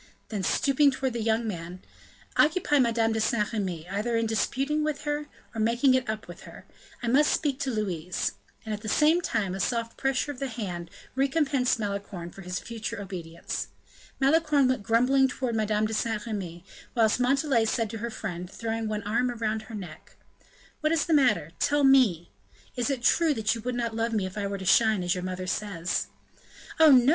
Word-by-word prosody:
Then 210 -3 -3
stooping 280 +8 +3
towards 265 -1 -2
the 235 - -2
young 225 +1 +1
man: 175 -2 -5 0.6
"Occupy 305 -2 +3
Madame 230 -2 +2
de 220 - 0
Saint 215 0 0
Remy, 180 -6 -3
either 210 +5 -1
in 230 - +1
disputing 270 +7 0
with 300 -1 -2
her, 295 0 -2 0.3
or 225 - -2
making 235 +4 +3
it 255 -3 +1
up 220 0 -4
with - - -10
her; - - -12 0.4
I - - -1
must 280 +6 +4
speak 285 -4 0
to 275 - -1
Louise." 185 -7 -2 0.3
And, 220 - -3
at 210 - -5
the 215 - -4
same 315 +8 +4
time, 205 - -1
a 190 - -4
soft 230 +2 -1
pressure 270 +1 0
of 265 - -10
the 275 - -2
hand 185 -8 -5 0.2
recompensed 270 -2 +1
Malicorne 200 -4 -4
for 195 - -11
his 180 0 -4
future 225 -2 -5
obedience. 170 -4 -5 0.5
Malicorne 290 0 +4
went 255 -3 0
grumbling 250 +5 +3
towards 255 -2 -3
Madame 215 -1 +1
de 220 - -3
Saint 220 -1 -1
Remy, 185 -6 -5 0.3
whilst 225 0 +3
Montalais 265 -2 +2
said 225 +1 0
to 225 - -5
her 235 +2 -3
friend, 180 -5 -5
throwing 225 +1 -3
one 210 -1 -3
arm 235 +4 +1
around 220 -2 -2
her 225 - -6
neck: 175 -6 -10 0.6
"What 310 0 +1
is 330 -1 +2
the 335 - +1
matter? 255 - +3
Tell 290 0 +2
me. 245 -12 +4 0.4
Is 245 +2 0
it 265 -4 -2
true 325 0 +3
that 220 -1 +1
you 230 - -5
would 250 +2 -3
not 235 -2 -2
love 230 +1 -1
me 210 -3 +1
if 185 0 -7
I 205 -1 -2
were 200 0 -3
to 190 - -7
shine, 220 -2 +4
as 175 0 +1
your 180 - -4
mother 185 0 -4
says?" 185 -2 -2 0.7
"Oh, 320 -1 +8
no!" 255 -1 +6
225 Hz, 200 wpm, -27 LUFS, 200-265 Hz, 0.7 s, Oh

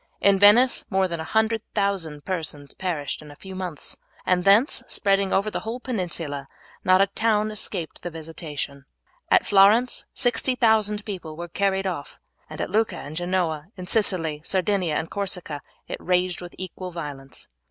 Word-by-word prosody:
In 200 -1 +4
Venice 225 +6 +6
more 190 -1 +2
than 170 -2 -4
100,000 200 -5 -1
persons 155 -6 -3
perished 165 -7 -3
in 150 - -12
a 145 - -11
few 190 +5 -10
months, 185 -5 -5 0.3
and 180 -1 +2
thence 205 +8 +5
spreading 195 -1 +1
over 205 +2 +1
the - - -2
whole 225 +3 -5
peninsula, 170 - -3 0.4
not 185 +1 +5
a - - +6
town 215 +1 +1
escaped 190 -5 -3
the 175 - -4
visitation. 155 -4 -6 0.4
At - - +5
Florence 210 +5 +5
60,000 220 -5 +2
people 175 -7 -6
were 170 +1 -5
carried 195 +2 0
off, 170 -7 -4 0.3
and - - -8
at - - -3
Lucca 220 +2 +1
and 145 +2 -8
Genoa, 175 -3 -1
in 185 - -6
Sicily, 175 -8 +1
Sardinia, 185 -3 0
and 160 - -1
Corsica 180 -7 -3 0.3
it - - -4
raged 180 0 +1
with 175 0 -9
equal 185 0 -6
violence. 145 -5 -7
185 Hz, 155 wpm, -24 LUFS, 160-205 Hz, 0.4 s, Venice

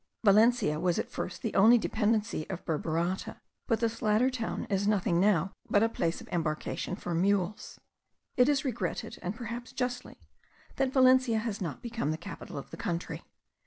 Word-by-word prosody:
Valencia 215 -6 +4
was 175 0 +1
at - - -3
first - - -5
only 220 +5 +7
a - - +6
dependency 215 -7 0
of 185 -2 -6
Burburata; 165 +3 -2 0.3
but 230 -1 +1
this 230 -1 -1
latter 220 +5 +3
town 230 -3 -3
is 200 0 0
nothing 190 -5 +2
now 190 -1 +2 0.2
but 205 - +4
a - - +4
place 170 -6 -1
of - - -12
embarkation 160 +1 -2
for 175 -3 -5
mules. 190 +2 0 0.6
It 250 +2 +5
is 285 -1 +1
regretted, 215 -9 -3
and 180 +4 -3
perhaps 235 +1 -6
justly, 250 -1 -4 0.6
that 270 -1 +1
Valencia 255 -3 +5
has 220 -2 -3
not 170 - -4
become 230 -9 -2
the 155 - -1
capital 165 - -8
of - - -8
the - - -8
country. 175 -5 -3
210 Hz, 170 wpm, -30 LUFS, 175-235 Hz, 0.6 s, only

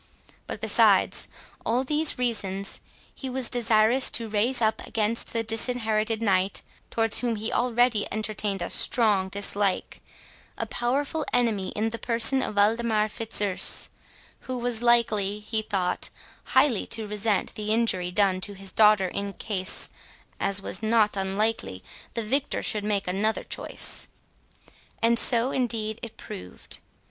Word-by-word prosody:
But - - -6
besides - - +3 0.4
all 245 +3 0
these 300 +3 +2
reasons, 200 -5 -2 0.3
he 265 - -6
was 255 -1 +1
desirous 235 +1 +4
to 230 -1 -2
raise 220 +5 +1
up 220 -1 +1
against 220 +1 -1
the 230 -1 0
Disinherited 225 -1 +1
Knight 195 -2 +1 0.3
(towards 225 -2 0
whom 240 -2 -1
he 220 +2 -3
already 240 -3 +1
entertained 210 -3 -2
a - - -3
strong 205 -6 +2
dislike) 200 0 0 0.6
a - - -2
powerful 275 +6 -1
enemy 225 -6 +1
in 220 +1 -1
the 230 - -5
person 235 +3 +3
of 215 - -4
Waldemar 215 +1 +2
Fitzurse, 210 -4 +1 0.5
who 255 -1 -5
was 240 -2 -2
likely, 215 -4 +2
he 220 +1 -2
thought, 190 -4 -1 0.4
highly 250 -9 +2
to 225 -1 -1
resent 210 0 -1
the 215 0 -4
injury 215 -6 +1
done 185 0 +1
to 205 - 0
his 195 0 -5
daughter, 210 -3 +4
in 200 +2 -4
case, 190 -3 -1 0.5
as 195 0 +2
was - - -3
not 220 -1 +2
unlikely, 195 - -2 0.3
the 230 - -2
victor 270 +6 -1
should 210 -1 +1
make 205 -2 -1
another 205 +4 -1
choice. - - -1 0.9
And 230 0 +3
so 240 +1 +3
indeed 225 -3 -2
it 230 - -8
proved. 90 0 -7
220 Hz, 140 wpm, -26 LUFS, 200-235 Hz, 0.9 s, desirous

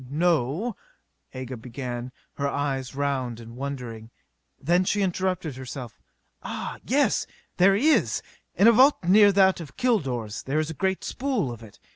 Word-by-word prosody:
"No 165 - 0 0.3
..." - - -28
Aga 130 -1 -5
began, 120 +1 -6 0.2
her 140 - -2
eyes 135 -2 -2
round 135 -4 -2
and 115 0 -11
wondering. 125 -5 -6 0.5
Then 175 +5 +2
she 205 +2 +1
interrupted 180 -6 -1
herself. 130 -2 -8 0.4
"Ah, - - -5
yes! 280 +3 +1 0.3
There 195 +2 +5
is! 300 +9 +2 0.3
In 205 - +5
a - - +9
vault 260 +3 +5
near 205 +4 +6
that 190 -1 +4
of 150 -5 -10
Kilor's 135 - 0
there 135 +3 -2
is 155 +1 -1
a - - -5
great 190 +3 -1
spool 245 - -1
of 115 -1 -9
it. 110 -3 -14
145 Hz, 155 wpm, -25 LUFS, 125-190 Hz, 0.5 s, a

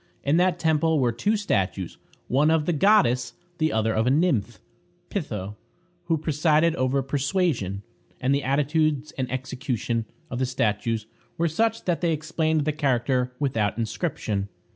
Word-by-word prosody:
In 145 +4 +2
that 180 0 +3
temple 160 -1 +2
were 125 -3 +2
two 205 - 0
statues: 95 - -1 0.3
one 145 +5 +3
of 160 -2 +2
the 175 - +1
goddess, 160 - +3 0.3
the 155 0 +2
other 110 0 +1
of 110 +2 +1
a - - +5
nymph, 130 - +1 0.5
Pitho, 105 - -4 0.5
who 165 -1 +1
presided 155 +1 +2
over 130 +1 +1
persuasion; 135 - -1 0.4
and 130 +2 +1
the 140 - +1
attitudes 150 +1 +1
and 130 -2 -4
execution 125 -3 -2 0.3
of 125 - -3
the 130 - +1
statues 110 -2 -1 0.3
were 170 - +2
such 225 +8 0
that 175 -2 0
they 170 -2 +2
explained 160 -1 0
the 155 - +2
character 130 -3 0
without 115 -7 0
inscription. 110 - -2
140 Hz, 150 wpm, -25 LUFS, 120-160 Hz, 0.5 s, a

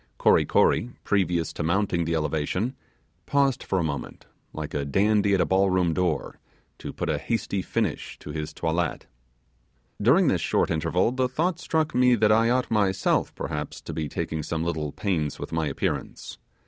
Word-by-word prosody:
Kory - - +4
Kory, 120 - +3
previous 90 -5 0
to - - -5
mounting 85 0 +1
the 85 0 0
elevation, 80 - -1 0.5
paused 135 +2 +2
for 95 - -1
a 90 - +1
moment, 70 -4 -5 0.3
like 75 -1 -6
a 70 - -1
dandy 100 +7 +2
at 95 - +2
a - - +3
ball 95 +1 +3
room 90 -3 +2
door, 90 -2 -1 0.4
to - - -6
put - - -4
a - - 0
hasty 100 -4 -2
finish 105 -3 -2
to 75 - -9
his 75 0 -4
toilet. 85 +1 -2 1.0
During - - +5
this - - +2
short - - +1
interval, 90 +7 +1
the 130 0 0
thought 165 +6 -1
struck 160 -2 0
me 125 0 +5
that 105 -1 +3
I 115 +2 +4
ought 125 0 +1
myself 100 -3 +1
perhaps 75 0 -4
to 80 - -7
be 75 -1 -3
taking 80 +3 -3
some 80 +1 -3
little 80 -3 -2
pains 80 -7 -2
with - - -7
my 80 -1 0
appearance. 70 - -4
90 Hz, 175 wpm, -25 LUFS, 80-110 Hz, 1.0 s, During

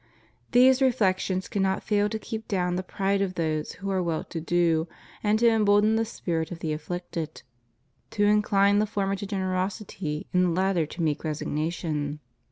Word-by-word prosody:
These 255 +2 +6
reflections 190 -7 +1
cannot 190 -1 0
fail 205 -1 +1
to 220 - -2
keep 220 0 -6
down 180 -3 0
the 185 - -1
pride 195 +1 -1
of 185 -2 -1
those 155 -2 -1
who 195 +1 -5
are 190 -1 +1
well 170 -3 -1
to 165 - -6
do, 165 -1 +2 0.3
and 210 0 +2
to 235 +1 +4
embolden 215 -1 +4
the 225 0 +1
spirit 165 -7 -3
of 175 - -5
the 160 -2 -2
afflicted; 165 0 -5 0.7
to 205 - 0
incline 205 -1 +4
the 215 - +1
former 195 -1 -1
to 195 +1 -6
generosity 185 -4 -3
and 180 0 +4
the - - +2
latter 180 -2 +1
to 170 +2 -5
meek 150 -2 0
resignation. 150 -1 -2
185 Hz, 175 wpm, -26 LUFS, 165-205 Hz, 0.7 s, These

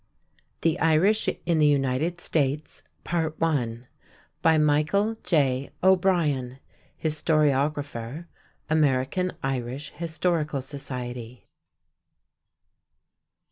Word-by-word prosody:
THE 165 0 +1
IRISH 165 +8 +3 0.2
IN 170 -2 +2
THE 150 - +5
UNITED 145 +4 +1
STATES 150 -2 -1 0.2
By 155 -2 -1
MICHAEL 155 +9 +2
J. 140 -6 +1
O'BRIEN, 170 -9 +2 0.4
Historiographer, 150 -3 0 0.4
American 155 +4 +1
Irish 135 +2 -3
Historical 160 -4 -1
Society. 125 -3 -7
150 Hz, 65 wpm, -26 LUFS, 130-165 Hz, 0.4 s, THE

